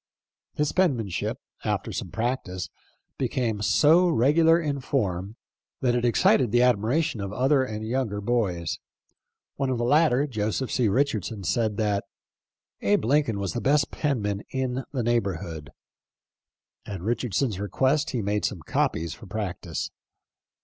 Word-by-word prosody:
His 150 0 +1
penmanship, 130 - 0 0.3
after - - -1
some - - -4
practice, 115 -6 -3 0.5
became 115 -5 -1
so 155 - +5
re 140 -4 +3
gular 165 +1 +5
in 145 -4 -2
form 100 -7 -2 0.5
that 125 -3 +2
it 120 -1 0
excited 120 +1 +4
the 120 +1 +4
admiration 125 +3 +1
of 100 -1 -4
other 130 +5 +3
and 110 -3 -4
younger 115 -4 -1
boys. 100 -7 -1 0.8
One 135 -2 0
of 130 - 0
the 120 - -1
latter, 145 +1 +4
Joseph 110 0 -2
C. 125 -4 +2
Richardson, 110 -3 0
said 110 0 0
that 105 -2 0 0.8
"Abe 105 +2 +2
Lincoln 140 -4 +2
was 100 -2 -2
the 120 - -2
best 145 +2 +2
penman 105 -9 -1
in 130 -1 -2
the 130 -4 -1
neighborhood." 95 -10 -1 1.2
At 100 -4 -5
Richardson's 115 -1 -1
request 130 +9 +1
he 120 -5 -2
made 105 +1 0
some 95 -6 -2
copies 80 +1 0
for 110 - -12
practice. 90 -5 -4
115 Hz, 140 wpm, -26 LUFS, 100-135 Hz, 1.2 s, so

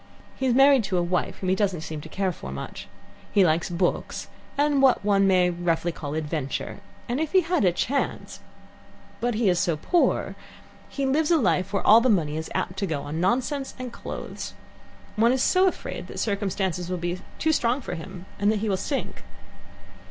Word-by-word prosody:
He 265 - -1
is 245 - +2
married 270 -2 +6
to 190 -2 -1
a 175 - +2
wife 175 +1 -1
whom 185 - -3
he - - +4
doesn't 190 -4 0
seem 155 -1 -6
to 160 - -10
care 190 +2 -1
for 65 - -8
much. 70 - -7 0.4
He 195 -2 +5
likes 160 +2 +1
books, 175 +1 -2 0.3
and 290 -1 +3
what 260 -6 +4
one 200 -1 +4
may 180 -2 +4
roughly 175 0 0
call 150 -2 -6
adventure, 150 -3 -3 0.3
and 245 +3 -1
if 315 +1 -2
he 375 - +6
had 350 - 0
a 180 - +5
chance 270 +10 -2 0.8
But 240 -1 0
he 220 -1 +1
is 180 -2 +3
so 170 -3 +1
poor. 345 - +1 0.6
He 275 - -2
lives 295 +3 +2
a 340 - +5
life 185 - +1
where 200 - -1
all 225 +2 +8
the 255 - +2
money 160 -8 +2
is 160 0 -4
apt 180 - -2
to 195 - -1
go 150 -4 -2
on 155 +3 -4
nonsense 260 +8 0
and 255 -2 -6
clothes. - - -7 0.6
One 230 +2 +5
is 260 0 +1
so 375 +1 +4
afraid 370 - -4
that - - -9
circumstances 190 -4 -1
will 180 - -1
be 175 +1 -3 0.2
too 315 - +2
strong 245 -3 +1
for - - -6
him 185 +2 -8
and 205 +1 +3
that 220 - 0
he 215 +1 -2
will 190 - +1
sink. 275 +8 -3
195 Hz, 205 wpm, -25 LUFS, 175-255 Hz, 0.8 s, all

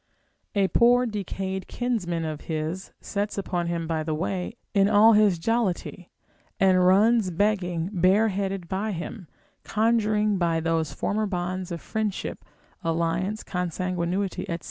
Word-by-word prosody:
A 200 -1 +3
poor 245 +1 +4
decayed 195 -3 -4
kinsman 180 -10 -2
of 155 -1 -4
his 160 +4 -3
sets 205 0 -3
upon 175 -3 -2
him 170 -1 -2
by 160 -1 -1
the 155 0 -2
way 185 +5 -3 0.2
in 200 -1 +4
all 220 +2 +7
his 210 -4 +4
jollity, 190 -2 -1 0.5
and 185 -1 +4
runs 205 +3 +4
begging 180 -2 0
bareheaded 195 0 +1
by 200 +3 -2
him, 180 +2 -6 0.4
conjuring 215 -2 +1
by 165 -2 +1
those 165 -1 0
former 215 +1 -1
bonds 180 -1 -3
of 170 - -4
friendship, 215 -3 -3 0.4
alliance, 170 +5 -1
consanguinity, 180 +1 -2
&c. 170 - -1
190 Hz, 130 wpm, -26 LUFS, 170-210 Hz, 0.5 s, all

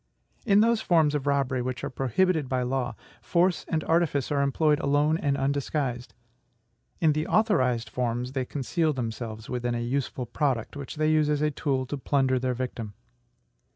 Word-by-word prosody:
In 205 0 +6
those 230 0 +3
forms 160 -4 +3
of 145 -1 -2
robbery 140 -2 +1
which 125 0 -4
are - - -2
prohibited 140 +4 +1
by 130 -1 0
law, 125 0 -2 0.3
force 175 +1 +1
and 160 -1 -1
artifice 160 -5 +1
are 140 -1 +2
employed 150 +2 +2
alone 145 +2 +2
and 140 -4 0
undisguised; 135 -2 -2 0.8
in 160 -4 +4
the 155 +1 -2
authorized 130 - +2
forms, 120 +2 -2
they 135 -1 -1
conceal 155 +4 -1
themselves 115 -3 -5
within 120 -1 -2
a - - -1
useful 125 +1 -2
product, 125 -1 -1
which 140 -2 -7
they 155 0 +1
use 155 -1 +3
as 150 0 +1
a 150 - +2
tool 135 -2 -1
to 140 +2 -5
plunder 130 -1 +1
their 125 0 -1
victim. 115 -4 -5
140 Hz, 170 wpm, -27 LUFS, 125-155 Hz, 0.8 s, In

